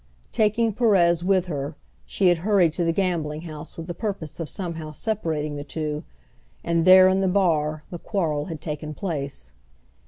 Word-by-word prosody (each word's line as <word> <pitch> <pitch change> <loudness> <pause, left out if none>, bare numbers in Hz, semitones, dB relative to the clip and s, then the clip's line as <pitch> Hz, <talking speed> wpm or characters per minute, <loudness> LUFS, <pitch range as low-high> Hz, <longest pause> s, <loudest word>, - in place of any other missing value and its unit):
Taking 220 +1 +2
Perez 180 -7 +3
with 185 -1 +2
her, 145 -3 -4 0.3
she 190 -2 +2
had 175 -2 +2
hurried 185 -4 +3
to 175 - -1
the 165 - +2
gambling 165 -4 -1
house 155 -2 -9
with 165 - -6
the 175 - -5
purpose 190 -7 -5
of 165 -3 -4
somehow 165 -5 -5
separating 155 -4 -2
the 145 - -5
two, 150 +1 -4 0.6
and 170 -1 +1
there 185 0 +9
in 190 0 +3
the 190 - +2
bar 155 -5 +1
the 175 - -6
quarrel 155 -8 -1
had 160 -4 -7
taken 150 -1 -5
place. 140 - -4
170 Hz, 175 wpm, -24 LUFS, 150-190 Hz, 0.6 s, there